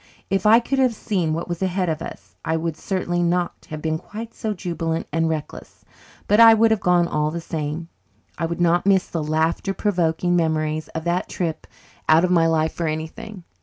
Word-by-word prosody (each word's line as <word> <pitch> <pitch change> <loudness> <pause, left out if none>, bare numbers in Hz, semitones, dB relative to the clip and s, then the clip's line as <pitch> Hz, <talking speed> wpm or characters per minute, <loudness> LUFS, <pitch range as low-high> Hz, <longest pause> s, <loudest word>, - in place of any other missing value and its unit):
If 195 +1 +2
I 225 +2 +8
could 270 +3 -2
have 255 -3 +3
seen 185 -8 -1
what 170 - -4
was 175 0 -4
ahead 185 -1 0
of 160 -2 -2
us - - -9
I 160 0 0
would 165 -1 -2
certainly 175 -1 -2
not 175 0 -1
have 155 -1 -6
been 160 0 -1
quite 225 +5 -8
so 220 - -3
jubilant 165 -4 -3
and 165 +1 +1
reckless, 155 -2 -6 0.4
but 210 +2 +4
I 225 -1 +9
would 225 0 +4
have 220 - +2
gone 180 -2 +3
all 150 -1 0
the 170 +2 -4
same. 160 0 -4 0.5
I 165 - -2
would 170 +1 -4
not 175 +2 +2
miss 190 -2 +4
the 165 -2 -3
laughter 160 +5 0
provoking 175 -3 +1
memories 155 -2 0
of 160 - -3
that 175 +2 -1
trip 165 -3 -3 0.4
out 160 +3 +6
of 180 - -1
my 165 -2 +4
life 160 -1 +1
for 170 - -2
anything. 160 +5 -5
170 Hz, 205 wpm, -22 LUFS, 160-190 Hz, 0.5 s, I